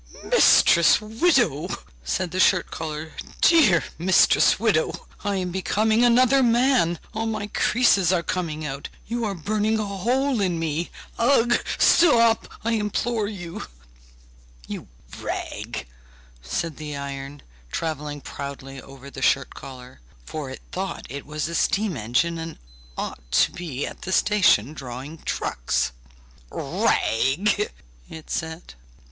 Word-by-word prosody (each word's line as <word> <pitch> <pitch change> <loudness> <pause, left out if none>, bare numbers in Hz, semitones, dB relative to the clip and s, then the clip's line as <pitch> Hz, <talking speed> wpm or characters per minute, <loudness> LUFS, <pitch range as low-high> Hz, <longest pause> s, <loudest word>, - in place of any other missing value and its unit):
'Mistress 170 -1 +5
widow!' 220 - +1 0.4
said 170 - -2
the 185 - -3
shirt 185 -2 +3
collar, 155 0 -5 0.3
'dear 280 - +5 0.2
mistress 180 +2 +4
widow! - - 0 0.2
I 205 -1 -1
am 180 -2 -2
becoming 215 +5 +1
another 255 +3 +5
man, 240 -7 +3 0.2
all 225 +1 -2
my 215 -2 -2
creases 205 -3 +3
are 175 -2 +1
coming 160 -4 -3
out; 140 -1 -5 0.2
you 235 0 -2
are 200 -2 -2
burning 215 +5 0
a 215 - -1
hole 240 +6 0
in 180 -3 0
me! 165 +1 -2 0.3
Ugh! 240 -1 +4 0.2
Stop, 235 -9 +5 0.2
I 230 - 0
implore 220 0 -1
you!' 175 -5 -7 1.0
'You - - -7 0.3
rag!' - - -5 0.6
said 150 - -3
the 150 -1 -6
iron, 140 0 -7 0.3
travelling 150 -2 -4
proudly 135 -1 -7
over 135 0 -12
the 135 - -8
shirt 135 +1 +2
collar, 130 - -11 0.2
for 150 -4 -5
it 130 - -9
thought 190 -1 -4
it 140 +3 -7
was 150 0 -3
a 170 - -6
steam 195 +1 +1
engine 130 +9 0
and 165 0 -6 0.4
ought - - -6
to - - +4
be 150 -6 -4
at - - -9
the 190 - -5
station 185 - +3
drawing 135 +3 -8
trucks. - - -1 0.6
'Rag!' 180 - +1 0.4
it 160 -1 -10
said. 160 +1 -4
175 Hz, 130 wpm, -24 LUFS, 145-215 Hz, 1.0 s, Mistress